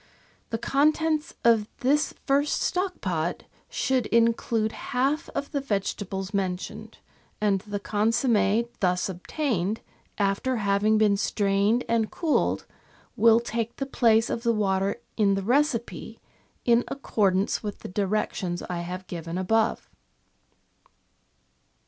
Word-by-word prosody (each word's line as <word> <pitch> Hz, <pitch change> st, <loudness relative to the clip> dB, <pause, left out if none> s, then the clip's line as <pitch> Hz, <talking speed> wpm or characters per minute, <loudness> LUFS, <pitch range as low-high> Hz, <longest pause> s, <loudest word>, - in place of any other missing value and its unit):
The 225 Hz, -, -1 dB
contents 305 Hz, +5 st, +1 dB
of 225 Hz, -3 st, +4 dB
this 290 Hz, +4 st, +2 dB
first 285 Hz, +1 st, +2 dB
stock 365 Hz, 0 st, -1 dB
pot 170 Hz, -3 st, -2 dB, 0.3 s
should 260 Hz, -4 st, 0 dB
include 230 Hz, -1 st, +2 dB
half 270 Hz, +8 st, -1 dB
of 280 Hz, 0 st, -3 dB
the 285 Hz, -3 st, -1 dB
vegetables 195 Hz, -4 st, -3 dB
mentioned, 185 Hz, -2 st, -3 dB, 0.4 s
and 205 Hz, -2 st, +2 dB
the 205 Hz, 0 st, -5 dB
consomm6 220 Hz, +1 st, +2 dB
thus 180 Hz, 0 st, +1 dB
obtained, 205 Hz, -, -2 dB, 0.4 s
after 200 Hz, +6 st, 0 dB
having 205 Hz, +1 st, +2 dB
been 210 Hz, -2 st, +3 dB
strained 200 Hz, +4 st, +1 dB
and 225 Hz, -2 st, +1 dB
cooled, 325 Hz, -4 st, 0 dB, 0.5 s
will 225 Hz, +1 st, +6 dB
take 235 Hz, 0 st, -3 dB
the 275 Hz, -, -3 dB
place 230 Hz, -4 st, +3 dB
of 230 Hz, -, -2 dB
the 235 Hz, -1 st, +2 dB
water 195 Hz, -2 st, 0 dB, 0.2 s
in 200 Hz, -3 st, +3 dB
the 195 Hz, -, -2 dB
recipe, 250 Hz, +1 st, 0 dB, 0.5 s
in 235 Hz, 0 st, +4 dB
accord 210 Hz, -8 st, 0 dB
ance 195 Hz, +2 st, 0 dB
with 205 Hz, -2 st, -6 dB
the -, -, -6 dB
directions 190 Hz, -2 st, -1 dB
I 175 Hz, -1 st, -4 dB
have 180 Hz, +2 st, -5 dB
given 170 Hz, -1 st, -5 dB
above. 220 Hz, +4 st, +1 dB
215 Hz, 125 wpm, -26 LUFS, 195-245 Hz, 0.5 s, will